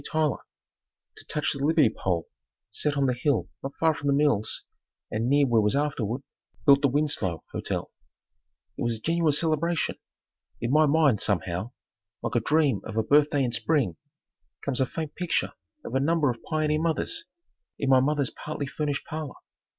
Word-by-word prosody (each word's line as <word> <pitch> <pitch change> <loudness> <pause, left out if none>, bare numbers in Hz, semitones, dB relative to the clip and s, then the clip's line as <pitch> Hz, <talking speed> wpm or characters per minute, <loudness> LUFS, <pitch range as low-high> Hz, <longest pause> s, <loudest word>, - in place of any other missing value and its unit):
Tyler, 155 -5 0 0.7
to - - -11
touch 150 - -1
the 140 -1 -4
Liberty 155 -2 +4
pole 85 -3 -1 0.4
set 145 +6 0
up - - -5
on 140 - +2
the 130 - +2
hill 130 0 0
not 135 +1 -6
far 160 -1 +3
from 145 - -5
the 140 - +4
mills 140 -7 +1 0.5
and 115 +3 -1
near 140 +1 +4
where 120 -4 +3
was 105 +4 +2
afterward 140 -4 -1 0.4
built 140 -1 +7
the 140 - +4
Winslow 130 - -1
Hotel. - - -3 0.9
It - - -6
was 120 -1 0
a - - -15
genuine 165 +4 +2
celebration. 160 +2 0 0.6
In 120 - -2
my 155 +1 +5
mind, 140 -7 +3
somehow, 95 +3 -1 0.5
like - - -2
a - - +3
dream 150 -3 +2
of 110 - -6
a 110 - +3
birthday 145 +3 +3
in 125 - 0
spring, 120 - +1 0.7
comes 135 -2 -1
a 130 - +2
faint 160 +1 -5
picture 180 -2 -1 0.3
of - - -6
a 135 - +2
number 150 -1 +2
of 120 - -9
pioneer 155 0 0
mothers, 170 - -1 0.5
in 140 - -2
my 130 - +7
mother's 140 0 +1
partly 150 -1 -5
furnished 145 0 -3
parlor. 155 -3 -5
140 Hz, 175 wpm, -27 LUFS, 120-155 Hz, 0.9 s, built